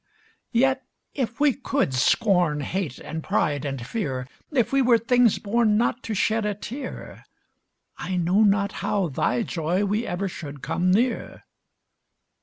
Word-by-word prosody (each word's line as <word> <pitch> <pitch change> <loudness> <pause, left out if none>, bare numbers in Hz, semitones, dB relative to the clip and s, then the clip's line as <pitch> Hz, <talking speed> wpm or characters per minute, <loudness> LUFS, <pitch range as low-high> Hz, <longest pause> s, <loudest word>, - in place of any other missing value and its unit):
Yet, 265 +2 +2 0.3
if 255 -2 -3
we 290 -2 +4
could 275 - -1
scorn, 175 - +2
Hate 170 -3 -3
and 160 -1 -6
pride, 145 -1 0
and 135 -4 -4
fear; 135 - -3 0.2
If 265 -3 +1
we 275 - +4
were 245 -2 +5
things 235 0 +3
born 215 0 +2
Not 240 +1 0
to 220 - -4
shed 220 +3 +1
a 210 -1 -1
tear, 255 +6 -7 0.8
I 185 0 -3
know 180 +4 +2
not 200 -1 +3
how 195 -5 0
thy 125 -3 0
joy 175 +5 -1
we 210 +4 -1
ever 180 +3 -2
should 150 -6 -8
come 180 +1 0
near. 230 +6 0
200 Hz, 150 wpm, -24 LUFS, 170-235 Hz, 0.8 s, were